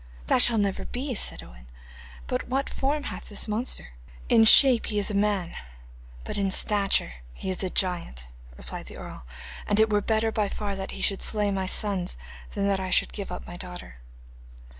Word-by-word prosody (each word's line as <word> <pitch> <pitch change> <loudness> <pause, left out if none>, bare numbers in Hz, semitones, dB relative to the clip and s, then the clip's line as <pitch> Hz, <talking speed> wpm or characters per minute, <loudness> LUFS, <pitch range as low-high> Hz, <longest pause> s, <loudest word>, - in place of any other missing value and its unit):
'That - - +4
shall 235 -2 +5
never 200 -2 0
be,' 260 +2 -3
said 210 - 0
Owen; - - -15 0.6
'but - - -3
what 270 +2 0
form 285 +2 -1
hath - - -7
this 205 +1 0
monster?' 215 - -2 0.4
'In 225 -1 +6
shape 250 +1 +7
he 210 - -1
is 205 +1 +1
a - - -4
man, 200 -4 0 0.7
but - - -3
in 195 -1 +1
stature 195 - +2 0.2
he 190 - -4
is 185 - -4
a 190 - 0
giant,' 170 - -2 0.3
replied - - -7
the - - -9
earl, - - -9 0.4
'and 205 0 +2
it 220 0 +4
were 205 -1 +3
better 220 +1 +1
by 210 -2 0
far 205 -1 -3
that 190 0 -5
he - - -3
should 195 - +2
slay 210 -2 0
my 190 -1 -1
sons 190 -3 0 0.4
than 200 -1 0
that 195 -1 +2
I 190 -1 -3
should - - +2
give 200 -3 -5
up 180 - -6
my 175 - -8
daughter. 180 - -8
200 Hz, 195 wpm, -26 LUFS, 185-220 Hz, 0.7 s, shape